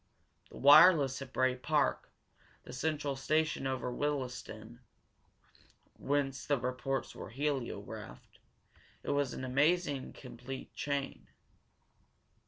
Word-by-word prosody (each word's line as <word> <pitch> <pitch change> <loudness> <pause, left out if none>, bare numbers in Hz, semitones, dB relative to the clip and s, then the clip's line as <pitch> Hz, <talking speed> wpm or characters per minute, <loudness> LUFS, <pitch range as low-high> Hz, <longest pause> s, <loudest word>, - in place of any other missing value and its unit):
The - - -12
wireless 145 -1 +7
at 135 -2 -8
Bray 130 -1 +2
Park, 150 +3 0 0.5
the - - -10
central 145 +1 -2
station 155 +1 0
near 130 0 0
Willesden, 125 -5 -4 1.2
whence 140 -1 -1
the 145 - +1
reports 130 +2 -3
were - - -8
heliographed 135 +1 -5 0.6
it - - -2
was 145 -2 0
an - - -6
amazingly 145 +2 +1
complete 130 0 -9
chain. 140 -1 -3
135 Hz, 100 wpm, -32 LUFS, 130-145 Hz, 1.2 s, wireless